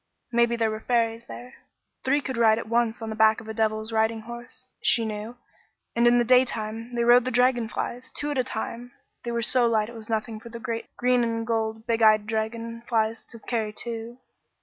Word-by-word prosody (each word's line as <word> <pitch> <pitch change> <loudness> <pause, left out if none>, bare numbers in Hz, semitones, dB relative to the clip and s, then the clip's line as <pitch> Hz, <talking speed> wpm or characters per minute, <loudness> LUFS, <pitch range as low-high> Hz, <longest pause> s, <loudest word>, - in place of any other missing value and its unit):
Maybe 235 0 +3
there 225 -2 +1
were 215 - -4
fairies 230 0 0
there. 245 +1 -9 0.5
Three 285 +3 +2
could 260 -2 -4
ride 225 -2 +4
at 230 - -5
once 230 0 0
on 220 - -4
the - - -4
back 220 0 +4
of 220 - -12
a 220 - -4
devil's 220 0 -1
riding 220 0 +1
horse, 240 +2 -7 0.2
she 230 - +3
knew, 215 +2 -5 0.6
and 235 +1 +4
in 240 0 +5
the 240 - +4
daytime 235 -2 +1
they 235 - +1
rode 240 +1 +6
the 255 - -2
dragon 245 -2 +2
flies, 245 +2 -4
two 295 0 -2
at 290 - -2
a - - +3
time; 240 0 -5 0.3
they 235 - -3
were 235 0 -1
so 245 0 +4
light 220 -1 +1
it - - -10
was 220 -1 -10
nothing 220 0 -2
for 235 - -11
the 235 - -7
great 230 0 -4
green 250 0 +3
and 230 -1 -1
gold, 220 -1 -2
big 230 0 0
eyed 215 -1 +5
dragon 230 +1 -3
flies 225 -1 0
to 230 - -12
carry 220 -1 -2
two. 230 +2 -5
230 Hz, 215 wpm, -26 LUFS, 220-240 Hz, 0.6 s, rode